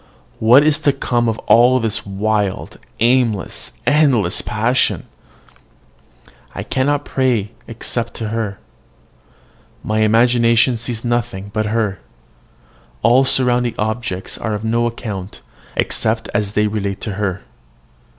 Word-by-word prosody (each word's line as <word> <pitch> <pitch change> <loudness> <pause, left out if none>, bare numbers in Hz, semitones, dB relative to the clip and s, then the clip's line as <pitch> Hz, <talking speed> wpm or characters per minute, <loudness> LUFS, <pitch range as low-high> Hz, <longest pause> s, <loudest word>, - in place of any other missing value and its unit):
What 120 +6 +6
is 155 -1 +3
to 145 -3 +2
come 120 -3 0
of 110 - -2
all 125 +2 +5
this 110 -3 -3
wild, 100 0 -2 0.2
aimless, 115 - +1
endless 135 - +2
passion? 115 +4 0 1.5
I - - -4
cannot 145 +2 0
pray 120 -6 0 0.2
except 115 0 -3
to 110 -2 -4
her. 110 -3 -3 1.3
My 110 0 -1
imagination 115 +2 +3
sees 115 0 -4
nothing 120 -5 -2
but 110 0 -1
her: 105 -3 -1 1.0
all 125 +4 +5
surrounding 125 -2 +1
objects 110 -3 -3
are 110 -2 -2
of 105 - -6
no 115 +1 +1
account, 105 -5 -6 0.3
except - - 0
as 105 -1 -1
they 105 0 +2
relate 100 -2 -2
to 110 - -3
her. 95 -2 -2
115 Hz, 120 wpm, -18 LUFS, 105-120 Hz, 1.5 s, What